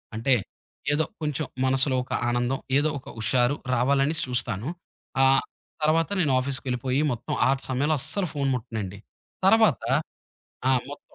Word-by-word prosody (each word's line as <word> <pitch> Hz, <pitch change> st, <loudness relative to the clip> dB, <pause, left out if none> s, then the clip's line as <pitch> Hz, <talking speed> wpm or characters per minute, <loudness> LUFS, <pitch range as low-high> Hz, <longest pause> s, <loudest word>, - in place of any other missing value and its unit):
అంటే 115 Hz, +4 st, +2 dB, 0.6 s
ఏదో 155 Hz, +2 st, +2 dB, 0.2 s
కొంచెం 150 Hz, 0 st, -1 dB, 0.2 s
మనసులో 130 Hz, +1 st, +2 dB
ఒక 130 Hz, -, -16 dB, 0.2 s
ఆనందం 120 Hz, +2 st, 0 dB, 0.2 s
ఏదో 150 Hz, +2 st, +3 dB
ఒక -, -, -12 dB
హుషారు 125 Hz, +4 st, +2 dB, 0.2 s
రావాలనేసి 140 Hz, +5 st, +2 dB
చూస్తాను. 120 Hz, -1 st, -1 dB, 0.5 s
ఆహ్, 135 Hz, 0 st, +5 dB, 0.4 s
తర్వాత, 160 Hz, +3 st, +3 dB
నేను 150 Hz, -5 st, +2 dB
ఆఫీస్‌కెళ్ళిపోయి 130 Hz, 0 st, -1 dB
మొత్తం 120 Hz, -, -4 dB
ఆ -, -, +3 dB, 0.2 s
సమయంలో 140 Hz, +4 st, +1 dB
అస్సలు 170 Hz, +8 st, -1 dB
ఫోను 140 Hz, -2 st, 0 dB
ముట్టనండి. 105 Hz, -5 st, -5 dB, 0.5 s
తర్వాత 220 Hz, -, +5 dB, 0.9 s
ఆ! -, -, +5 dB, 0.2 s
మొత్ 145 Hz, -, -8 dB
135 Hz, 130 wpm, -26 LUFS, 125-150 Hz, 0.9 s, ఆహ్